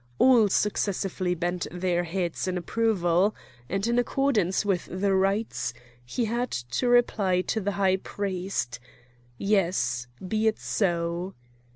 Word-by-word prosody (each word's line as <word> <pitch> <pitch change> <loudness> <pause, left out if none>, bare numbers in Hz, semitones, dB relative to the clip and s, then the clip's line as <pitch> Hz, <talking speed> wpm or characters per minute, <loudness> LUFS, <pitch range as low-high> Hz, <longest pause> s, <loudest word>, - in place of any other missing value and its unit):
All 240 -5 +6
successively 190 -3 0
bent 175 +1 -2
their 175 -1 0
heads 175 0 -2
in 185 -1 -1
approval; 190 -1 +1 0.3
and 195 +2 -1
in 235 +1 +2
accordance 235 -8 +1
with 190 -4 0
the 195 +2 0
rites 195 +3 0 0.3
he 175 - -2
had 240 +3 -1
to 120 - -2
reply 205 -7 +3
to 220 +4 -2
the 205 +1 -1
high 190 -1 +2
priest: 185 -11 -3 0.6
"Yes; 170 - +1 0.2
be 220 +2 +1
it 220 - +2
so." 175 -1 -1
190 Hz, 130 wpm, -27 LUFS, 175-215 Hz, 0.6 s, All